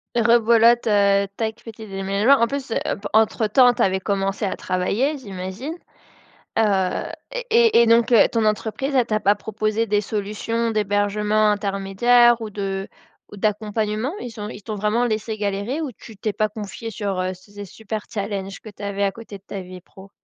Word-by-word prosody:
Rebelote, 235 0 +4
heu, 200 -1 +3
tac, 220 0 -3
petit 220 -1 -10
déménagement, 195 +5 +2
en 235 - +4
plus, 275 -1 -5
heu, - - 0 0.3
pe 205 - -4
entre-temps, 220 +3 +4
tu - - -3
avais 190 0 +2
commencé 195 +1 -1
à 195 - -1
travailler, 205 +11 -1
j'imagine? 200 - -6 0.9
Heu, 195 -4 +1 0.3
et - - -3
et 455 - +5
et 235 - +3
donc, 230 +1 +4
heu, 225 - +6
ton 225 -2 +1
entreprise, 220 +6 -1
elle 255 -2 +4
t'a 215 -2 -1
pas 205 0 +4
proposé 215 +2 -2
des 205 0 +2
solutions 215 +3 -2
d'hébergement 210 0 +1
intermédiaires 210 +4 +3
ou 220 - -4
de 195 -1 -4 0.4
ou 205 - -10
d'accompagnement? 215 - -1
Ils 230 -3 -8
ont 210 - -4
ils 205 -2 -9
t'ont 215 0 -5
vraiment 210 +4 +1
laissé 220 -1 -2
galérer 205 +8 -2
ou 285 -5 -4
tu 220 0 -14
t'es 210 +2 -2
pas 215 +1 0
confié 215 +2 -7
sur, 200 -4 -3
heu, 185 0 -2
ces 205 +3 -14
ess 200 - -7
super 220 -1 -6
challenges 200 -2 -4
que 215 - -10
tu 205 - -14
avais 200 0 -1
à 195 - +1
côté 225 -3 -10
de 195 - -17
ta 195 - -6
vie 185 -1 -10
pro? 190 +2 -16
215 Hz, 185 wpm, -22 LUFS, 200-230 Hz, 0.9 s, heu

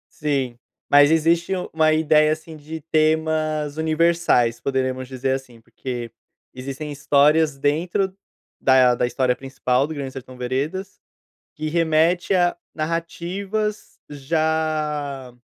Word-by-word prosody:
Sim, 135 -5 -2 0.3
mas 145 0 +7
existe 165 +3 +2
u 180 - -4
uma 155 -1 +3
ideia, 155 -1 +4
assim, 155 0 -7
de 155 +2 -8
temas 155 -1 +1
universais, 160 -7 +2
poderemos 130 -1 -1
dizer 130 0 -3
assim, 125 -4 -12
porque 120 0 -6 0.4
existem 135 +4 -6
histórias 145 +1 +3
dentro 175 +7 0 0.5
da 130 -2 +5
da 120 - +1
história 125 0 0
principal 135 0 0
do 160 - -6
Grande 135 -3 -5
Sertão 130 -1 -10
Veredas, 145 +11 -3 0.6
que 155 0 -3
remete 165 +3 +2
a 175 -1 +2 0.2
narrativas 185 +6 -3
já 150 -3 -2
150 Hz, 115 wpm, -22 LUFS, 135-160 Hz, 0.6 s, mas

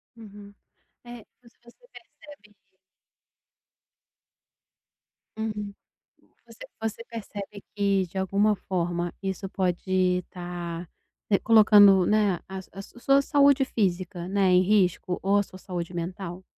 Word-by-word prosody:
Uhum, 205 -2 -13 0.5
eh, 240 -2 -11 0.2
você 235 -1 -22
você 365 - -20
percebe 210 -9 -16 2.8
Uhum. 210 -2 -4 0.7
Você - - -12 0.2
você 225 +1 -4
percebe 205 -3 -8
que 200 -2 +1
de 190 - -6
alguma 200 +3 +1
forma 175 -2 -3
isso 195 0 -4
pode 185 -1 -2 0.3
estar, 175 -1 -7 0.4
né, 200 - +4
colocando, 205 -4 +6
né, 210 -2 +2
a 190 0 -6
a 195 - -8
sua 240 - -16
sua 275 +2 +4
saúde 280 -1 +4
física, 185 -6 -2
né, 195 -1 +2
em 180 0 +5
risco 185 -2 +1
ou 200 +1 +3
a - - +3
sua 185 -1 -13
saúde 180 -2 -6
mental? 175 +1 -6
195 Hz, 120 wpm, -26 LUFS, 180-215 Hz, 2.8 s, colocando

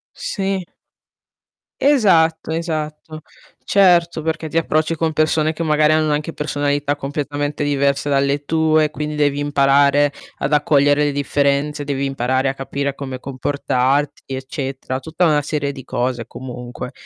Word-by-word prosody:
Sì. 195 -1 -2 1.2
Esatto, 175 - +3
esatto. 155 -1 -4 0.4
Certo, 175 -4 +4
perché 160 0 -2
ti 165 - -2
approcci 155 0 +1
con 160 0 -1
persone 155 0 +1
che 165 - -4
magari 155 -1 +3
hanno 155 -1 +2
anche 150 +2 -2
personalità 145 -1 -1
completamente 145 +1 -3
diverse 140 0 +1
dalle 140 +1 +1
tue, 155 0 +2
quindi 150 0 -4
devi 145 -1 +1
imparare 145 0 +3 0.3
ad 135 - -2
accogliere 145 0 +3
le 145 - +1
differenze, 145 +1 0
devi 140 -1 -2
imparare 130 0 0
a - - -2
capire 140 +1 -3
come 135 -2 -6
comportarti, 135 +1 -1
eccetera. 130 0 -4
Tutta 160 +5 -1
una 150 -3 +3
serie 145 -1 -2
di 135 -2 -10
cose 120 -1 -2
comunque. 125 -1 -7
145 Hz, 135 wpm, -19 LUFS, 140-155 Hz, 1.2 s, Certo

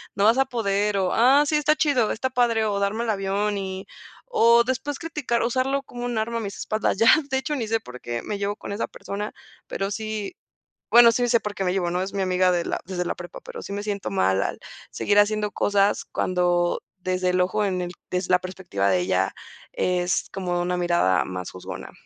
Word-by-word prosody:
no 200 - +1
vas 230 +4 +5
a 270 - +4
poder", 210 -4 0
o, 185 -2 +1
"Ah, 265 +5 +5
sí, 305 - +1
está 300 +1 +3
chido, 280 -8 +2
está 260 +4 -2
padre", 235 -3 +2
o 200 -1 0
darme 205 +4 0
el 230 - -2
avión 200 +1 -1
y 190 0 -5 0.5
o 235 +1 +6
después 265 +2 -2
criticar 295 -8 -1
usarlo 260 +3 0
como 245 -2 -7
un 240 -2 -2
arma 230 +2 -1
a - - -2
mis 200 -2 -5
espaldas 215 -2 -1
ya 225 - +3 0.3
de 265 - +2
hecho 295 +3 -2
ni 230 -6 -3
sé 225 +1 +1
por 125 - -11
qué 120 -1 -4
me 205 - -3
llevo 200 +1 -1
con 215 - -8
esa 210 - -2
persona, 205 +2 -6 0.4
pero 195 0 -3
sí 215 - -4 0.6
bueno, 235 0 +8
sí 245 +1 +1
sé 235 -1 +4
por 210 -1 -5
qué 195 - -2
me 180 - +1
llevo, 180 -2 0
¿no?, 180 - -1
es 195 +1 -5
mi 195 - 0
amiga 185 0 +2
desde 180 +1 -2
la - - -2
prepa, 175 -1 -9
pero - - -8
sí - - -7
me 200 0 -3
siento 200 -2 -3
mal 95 - +2
al - - -4 0.3
seguir 205 0 +1
haciendo 210 0 +3
cosas 200 0 +2
cuando, 175 -1 +1 0.2
desde 185 0 0
el 180 0 +1
ojo, 210 +4 0
en 185 -2 -1
el 175 0 -4 0.2
desde 180 0 -2
la 180 - +6
perspectiva 180 - -2
de 90 - +3
ella, 90 - 0 0.4
es 180 0 0
como 180 -2 -2
una 180 0 -1
mirada 175 - +2
más 90 -1 -6
juzgona. 90 - -8
200 Hz, 220 wpm, -24 LUFS, 180-230 Hz, 0.6 s, bueno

